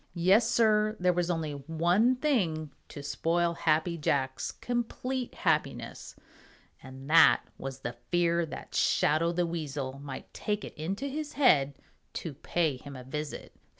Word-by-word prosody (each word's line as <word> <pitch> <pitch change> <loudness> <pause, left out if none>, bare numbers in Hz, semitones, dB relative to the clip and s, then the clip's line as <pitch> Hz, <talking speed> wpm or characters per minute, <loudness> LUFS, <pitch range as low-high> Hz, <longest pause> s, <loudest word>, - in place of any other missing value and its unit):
Yes, 195 +7 +4
Sir, 215 -1 +3
there 180 0 +3
was 175 0 0
only 165 -3 -1
one 170 - +2
thing 180 - 0 0.2
to 145 - -8
spoil 170 +4 0
Happy 165 +1 +1
Jack's 130 -4 0
complete 245 +1 -3
happiness, - - -1 0.7
and 130 +1 -11
that 165 +2 +6 0.2
was 135 0 -6
the 120 - -4 0.2
fear 170 -1 +2
that - - -9
Shadow 160 +3 +2
the 175 0 0
Weasel 145 -5 -4
might 140 -1 -8
take 210 -1 -2
it - - -9
into 195 - -4
his 295 +2 -4
head 145 - +4 0.4
to 165 - -5
pay 155 0 -1
him 140 +2 -10
a 130 - -8
visit. 150 +3 -6
165 Hz, 145 wpm, -29 LUFS, 145-205 Hz, 0.7 s, that